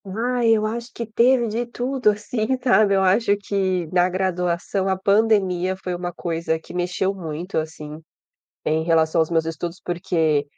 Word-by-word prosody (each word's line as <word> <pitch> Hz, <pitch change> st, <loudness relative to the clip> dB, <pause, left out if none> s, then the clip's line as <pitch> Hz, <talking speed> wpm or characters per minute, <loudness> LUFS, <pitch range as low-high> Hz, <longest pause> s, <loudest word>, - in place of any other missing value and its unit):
Ai, 235 Hz, +4 st, 0 dB
eu 215 Hz, -, -1 dB
acho 235 Hz, +2 st, -4 dB
que 235 Hz, -, -4 dB
teve 235 Hz, +2 st, +3 dB
de 225 Hz, +3 st, -2 dB
tudo, 250 Hz, 0 st, 0 dB
assim, 210 Hz, +2 st, -2 dB, 0.2 s
sabe. 215 Hz, -5 st, +4 dB
Eu 190 Hz, -, +2 dB
acho 200 Hz, +2 st, +3 dB
que 190 Hz, -3 st, -1 dB
na 180 Hz, 0 st, +3 dB
graduação 185 Hz, +1 st, -1 dB
a 190 Hz, -, +1 dB
pandemia 190 Hz, -3 st, +2 dB
foi 185 Hz, -1 st, -5 dB
uma 175 Hz, 0 st, -4 dB
coisa 165 Hz, -1 st, -2 dB
que 160 Hz, -, -13 dB
mexeu 180 Hz, +2 st, -1 dB
muito, 175 Hz, 0 st, -5 dB
assim, 155 Hz, -1 st, -7 dB, 0.6 s
em 155 Hz, +1 st, +1 dB
relação 165 Hz, 0 st, +2 dB
aos 160 Hz, -, +1 dB
meus 165 Hz, -1 st, +2 dB
estudos, 165 Hz, +2 st, -5 dB
porque 170 Hz, -5 st, 0 dB
185 Hz, 165 wpm, -22 LUFS, 170-215 Hz, 0.6 s, sabe